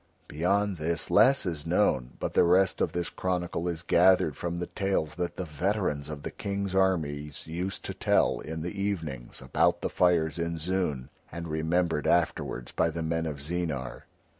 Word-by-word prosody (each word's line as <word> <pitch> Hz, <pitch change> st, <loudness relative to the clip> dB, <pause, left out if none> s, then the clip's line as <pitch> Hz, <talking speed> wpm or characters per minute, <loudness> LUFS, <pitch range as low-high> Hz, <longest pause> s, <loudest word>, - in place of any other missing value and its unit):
Beyond 95 Hz, +5 st, +1 dB
this 80 Hz, +1 st, -1 dB
less 135 Hz, -3 st, +5 dB
is 80 Hz, -5 st, -3 dB
known, 60 Hz, -1 st, +1 dB
but -, -, -3 dB
the -, -, +5 dB
rest 90 Hz, +2 st, +3 dB
of -, -, +1 dB
this 85 Hz, -1 st, -2 dB
chronicle 90 Hz, -2 st, -2 dB
is 85 Hz, -1 st, -3 dB
gathered 90 Hz, -5 st, +4 dB
from 85 Hz, 0 st, -3 dB
the 90 Hz, -, -2 dB
tales 95 Hz, -6 st, -1 dB
that 90 Hz, -1 st, -3 dB
the 90 Hz, -, -2 dB
veterans 80 Hz, -2 st, -1 dB
of 75 Hz, -2 st, -7 dB
the -, -, -4 dB
King's 100 Hz, -1 st, -3 dB
armies 75 Hz, -7 st, 0 dB
used 90 Hz, +4 st, -4 dB
to -, -, -3 dB
tell -, -, +2 dB
in 80 Hz, +1 st, -5 dB
the 90 Hz, -, -4 dB
evenings 80 Hz, -11 st, -4 dB
about -, -, +2 dB
the -, -, -2 dB
fires 85 Hz, -3 st, +2 dB
in 85 Hz, 0 st, -2 dB
Zoon 80 Hz, -6 st, -2 dB, 0.2 s
and 85 Hz, +1 st, -6 dB
remembered 80 Hz, 0 st, 0 dB
afterwards 85 Hz, -7 st, 0 dB
by 85 Hz, -, +1 dB
the 80 Hz, +1 st, -4 dB
men 80 Hz, 0 st, -1 dB
of 75 Hz, -2 st, -5 dB
Zeenar. 75 Hz, -4 st, -3 dB
85 Hz, 175 wpm, -28 LUFS, 75-90 Hz, 0.2 s, less